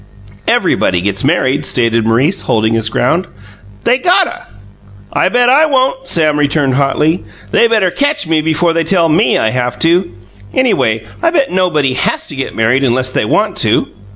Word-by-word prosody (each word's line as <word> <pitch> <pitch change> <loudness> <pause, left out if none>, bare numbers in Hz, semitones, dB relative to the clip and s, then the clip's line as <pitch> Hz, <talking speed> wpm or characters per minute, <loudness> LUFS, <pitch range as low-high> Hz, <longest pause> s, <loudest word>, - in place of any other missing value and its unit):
"Everybody 90 - +1
gets 100 +3 -2
married," 140 -2 0
stated 115 -2 0
Maurice, 135 - +1
holding 110 0 0
his 110 -1 0
ground. 165 +11 0 0.6
"They 250 - +2
gotta." 365 +2 0 0.7
"I'll - - +1
bet 245 +3 +2
I 295 +5 +4
don't!" 265 -1 0
Sam 155 -3 +2
returned 145 -2 0
hotly. 150 +5 0 0.3
"They 235 - +3
better 215 -6 +1
catch 285 - -1
me 160 -1 +1
before 160 +2 0
they 165 0 0
tell 165 0 +1
ME 170 +8 +2
I 110 - 0
have 125 0 -2
to. 175 +3 +2 0.5
Anyway, 115 - +1 0.2
I 335 - +2
bet 290 -5 0
nobody 160 -8 0
has - - -1
to 145 - -5
get 135 - -5
married 120 +4 +1
unless 130 0 0
they - - -1
want - - 0
to." - - +1
155 Hz, 170 wpm, -13 LUFS, 125-200 Hz, 0.7 s, I